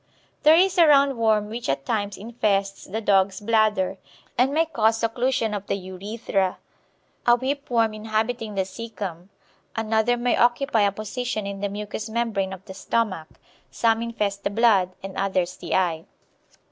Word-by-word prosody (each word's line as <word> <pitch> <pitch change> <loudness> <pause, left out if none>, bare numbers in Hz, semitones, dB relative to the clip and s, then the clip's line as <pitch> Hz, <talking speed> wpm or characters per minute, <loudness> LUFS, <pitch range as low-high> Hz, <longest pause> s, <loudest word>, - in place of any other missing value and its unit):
There 310 +2 +7
is 370 +1 +3
a 335 - +7
round 280 -2 +5
worm 220 -2 +2
which 235 +1 -4
at 135 0 -1
times 205 -2 -2
infests 200 -2 -1
the 220 +4 -4
dog's 195 -2 +2
bladder, 210 -3 +1 0.4
and 255 +3 +3
may 320 +3 +2
cause 225 -7 +1
occlusion 230 -1 0
of 205 0 -6
the - - 0
urethra; 195 0 -2 0.7
a 240 - +7
whip 275 +3 -3
worm 230 -3 +2
inhabiting 220 +1 -2
the 190 - +1
caecum; 195 -5 -7 0.5
another 225 +2 +1
may 240 0 +1
occupy 240 0 +2
a 200 -1 +3
position 215 +1 -4
in 200 0 -5
the 200 - -1
mucous 210 +2 -5
membrane 220 -4 -1
of 190 +1 -9
the 190 - -9
stomach; 190 -5 -1 0.4
some 225 -1 +1
infest 210 -4 -2
the - - 0
blood, 205 -4 +3
and 195 -1 -7
others 185 -2 0
the - - -3
eye. 170 -3 0
215 Hz, 160 wpm, -24 LUFS, 195-235 Hz, 0.7 s, There